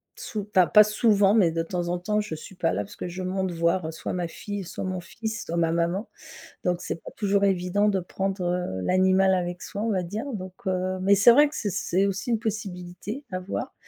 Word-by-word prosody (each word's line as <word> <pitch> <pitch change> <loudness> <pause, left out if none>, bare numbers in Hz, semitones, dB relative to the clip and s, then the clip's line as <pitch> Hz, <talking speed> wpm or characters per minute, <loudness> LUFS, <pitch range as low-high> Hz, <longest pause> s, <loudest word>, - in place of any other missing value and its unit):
sou 210 -2 -5
enfin 185 -2 +6
pas 210 0 +8
souvent, 210 -1 +3
mais 195 -7 +5
de 165 0 -1
temps 175 +1 -3
en 175 +1 0
temps, 210 +4 0
je 165 -6 -5
suis 175 - -10
pas 175 -3 0
là 105 - -1
parce 100 - -12
que - - -5
je 185 +2 -5
monte 190 0 -1
voir, 170 +1 +1
heu, - - -4
soit 160 - -5
ma 175 -1 -2
fille, 205 +4 -6
soit 175 - -6
mon 185 -1 -2
fils, 220 +5 -5
soit 170 +1 -3
ma 165 -1 +2
maman, 170 +5 0 0.6
donc 180 -1 +1
c'est 170 - -4
pas - - -10
toujours 200 -1 +2
évident 195 +2 +2
de 195 -2 +1
prendre, 190 +2 -3
heu, 175 - -1
l'animal 190 - +4
avec 175 -1 -2
soi, 205 - -5
on 230 - 0
va 185 -2 0
dire, 210 +8 -4
donc 185 -2 -6
heu, 185 0 -1
mais 195 +2 +5
c'est 200 +4 +7
vrai 290 +5 +6
que 295 - -12
c'est 205 - -2
c'est 190 +3 +1
aussi 195 +5 -2
une 225 - +1
possibilité, 205 +2 -5
à 185 - -2
voir, 185 +1 -4
185 Hz, 240 wpm, -26 LUFS, 175-205 Hz, 0.6 s, pas